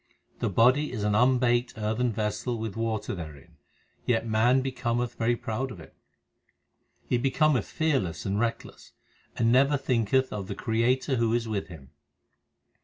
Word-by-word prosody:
The -, -, 0 dB
body 130 Hz, +9 st, +3 dB
is 110 Hz, -4 st, -4 dB
an 105 Hz, 0 st, +1 dB
unbaked 125 Hz, +1 st, +2 dB
earthen 110 Hz, +3 st, 0 dB
vessel 110 Hz, +3 st, -2 dB
with 110 Hz, -2 st, -5 dB
water 115 Hz, -1 st, -2 dB
therein, 80 Hz, -2 st, -10 dB, 0.5 s
Yet 115 Hz, -2 st, 0 dB
man 115 Hz, +4 st, +3 dB
becometh 120 Hz, -2 st, -2 dB
very 120 Hz, +1 st, 0 dB
proud 120 Hz, +3 st, -3 dB
of 105 Hz, -, -9 dB
it. 80 Hz, -, -14 dB, 1.1 s
He 120 Hz, -, +1 dB
becometh 135 Hz, -2 st, +2 dB
fearless 130 Hz, -, -1 dB
and 100 Hz, +1 st, -1 dB
reckless, 115 Hz, 0 st, -4 dB, 0.4 s
And 115 Hz, -1 st, +2 dB
never 140 Hz, +3 st, +4 dB
thinketh 130 Hz, 0 st, +1 dB
of 100 Hz, -3 st, -5 dB
the -, -, -5 dB
Creator 125 Hz, +4 st, 0 dB
who 115 Hz, 0 st, +2 dB
is 120 Hz, -1 st, -1 dB
with 105 Hz, -3 st, -3 dB
him. 75 Hz, -7 st, -13 dB
115 Hz, 150 wpm, -27 LUFS, 105-125 Hz, 1.1 s, never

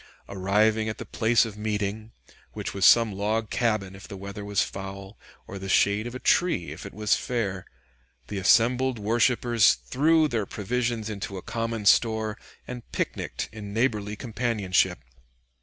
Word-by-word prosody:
Arriving 105 Hz, +3 st, +1 dB
at 110 Hz, -, -5 dB
the -, -, -7 dB
place 115 Hz, 0 st, +2 dB
of 110 Hz, -3 st, -7 dB
meeting, 105 Hz, +1 st, -3 dB, 0.4 s
which -, -, -5 dB
was 100 Hz, 0 st, +4 dB
some 115 Hz, -2 st, +6 dB
log 105 Hz, +2 st, -1 dB
cabin 110 Hz, -5 st, 0 dB
if 95 Hz, -, -12 dB
the 100 Hz, -, -8 dB
weather 100 Hz, +1 st, -7 dB
was 100 Hz, -1 st, +1 dB
foul, 95 Hz, +1 st, -7 dB, 0.3 s
or 100 Hz, -, -8 dB
the 95 Hz, 0 st, -6 dB
shade 100 Hz, +4 st, +3 dB
of 120 Hz, -, -7 dB
a -, -, -5 dB
tree 170 Hz, -, +1 dB
if -, -, -8 dB
it -, -, -10 dB
was 105 Hz, 0 st, +1 dB
fair, 100 Hz, -7 st, -3 dB, 0.6 s
the 100 Hz, -, -4 dB
assembled 120 Hz, +6 st, +3 dB
worshipers 115 Hz, +1 st, +3 dB
threw 155 Hz, +4 st, +2 dB
their 115 Hz, -7 st, -2 dB
provisions 120 Hz, +1 st, -2 dB
into 100 Hz, -2 st, -5 dB
a 90 Hz, -, -8 dB
common 115 Hz, -2 st, -3 dB
store 110 Hz, 0 st, +3 dB, 0.3 s
and 125 Hz, -2 st, -8 dB
picnicked -, -, -3 dB
in 105 Hz, -1 st, -8 dB
neighborly 105 Hz, -4 st, 0 dB
companionship. 105 Hz, -6 st, 0 dB
110 Hz, 155 wpm, -26 LUFS, 100-115 Hz, 0.6 s, some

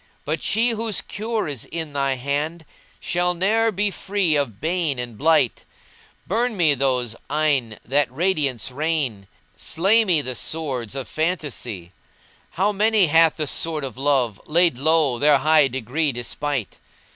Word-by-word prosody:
But -, -, -2 dB
she 235 Hz, +2 st, +1 dB
whose 225 Hz, -2 st, -1 dB
cure 220 Hz, -1 st, -3 dB
is 140 Hz, -6 st, -5 dB
in 160 Hz, -3 st, -6 dB
thy 140 Hz, -1 st, 0 dB
hand 145 Hz, +5 st, -3 dB, 0.2 s
* -, -, -30 dB
Shall 180 Hz, 0 st, 0 dB
ne'er 220 Hz, +5 st, +2 dB
be 205 Hz, +1 st, 0 dB
free 195 Hz, -5 st, 0 dB
of 120 Hz, -8 st, -1 dB
bane 160 Hz, -2 st, -1 dB
and 120 Hz, -2 st, -5 dB
blight; 150 Hz, -1 st, +2 dB, 0.6 s
Burn 230 Hz, +2 st, -1 dB
me 160 Hz, -5 st, +4 dB
those 125 Hz, -4 st, 0 dB
eyne 140 Hz, -8 st, +1 dB
that 135 Hz, +1 st, +1 dB
radiance 140 Hz, -, -1 dB
rain 140 Hz, -, -2 dB, 0.2 s
* -, -, -39 dB
Slay 200 Hz, +7 st, +3 dB
me 170 Hz, -8 st, +2 dB
the 130 Hz, -, -3 dB
swords 130 Hz, -4 st, -4 dB
of 135 Hz, -4 st, -4 dB
phantasy; 140 Hz, -, -3 dB, 0.6 s
How 195 Hz, +4 st, 0 dB
many 210 Hz, 0 st, +3 dB
hath 165 Hz, 0 st, +4 dB
the 155 Hz, -, -1 dB
sword 155 Hz, +1 st, -2 dB
of 130 Hz, -4 st, -5 dB
Love 130 Hz, -6 st, 0 dB
* -, -, -32 dB
Laid 165 Hz, -5 st, +3 dB
low, 150 Hz, -4 st, +2 dB
their 145 Hz, 0 st, +5 dB
high 155 Hz, 0 st, +4 dB
degree 130 Hz, +4 st, -1 dB
despite? 125 Hz, 0 st, -4 dB
150 Hz, 155 wpm, -22 LUFS, 130-175 Hz, 0.6 s, their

